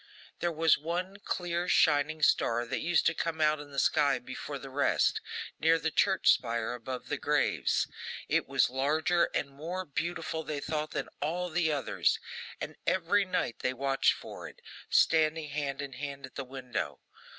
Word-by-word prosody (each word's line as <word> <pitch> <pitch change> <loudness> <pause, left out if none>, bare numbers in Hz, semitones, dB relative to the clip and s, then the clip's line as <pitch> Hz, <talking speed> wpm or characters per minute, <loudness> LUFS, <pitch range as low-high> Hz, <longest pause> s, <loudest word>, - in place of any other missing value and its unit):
There 175 - 0
was 160 -1 +3
one 180 +5 -3
clear 175 0 -2
shining 155 0 +3
star 120 -4 +3
that 115 - -2
used 175 0 +2
to 160 - +4
come 165 -1 -2
out 155 -1 +3
in 145 0 -9
the 140 - -10
sky 140 -1 +3
before 130 +3 -6
the 135 0 -9
rest, 140 +2 +2 0.4
near 165 +1 +4
the 160 0 -1
church 190 +4 +4
spire, 115 -1 0
above 125 +1 -6
the - - -2
graves. - - +1 0.4
It - - +1
was - - +3
larger 155 +6 +2
and 140 - -1
more 170 +7 -5
beautiful, 160 +1 -3
they 150 -2 -3
thought, 155 +1 -2
than - - -3
all 175 +4 -1
the 165 -1 +2
others, 140 -5 +1 0.4
and - - -6
every 190 +3 +3
night 180 -10 -1
they 130 - 0
watched 135 +1 +2
for - - -8
it, - - -14 0.3
standing 160 -1 +3
hand 140 -1 -3
in 140 -2 -7
hand 140 +1 -6
at 130 - -10
a - - -2
window. 125 - -4
150 Hz, 175 wpm, -30 LUFS, 135-165 Hz, 0.4 s, to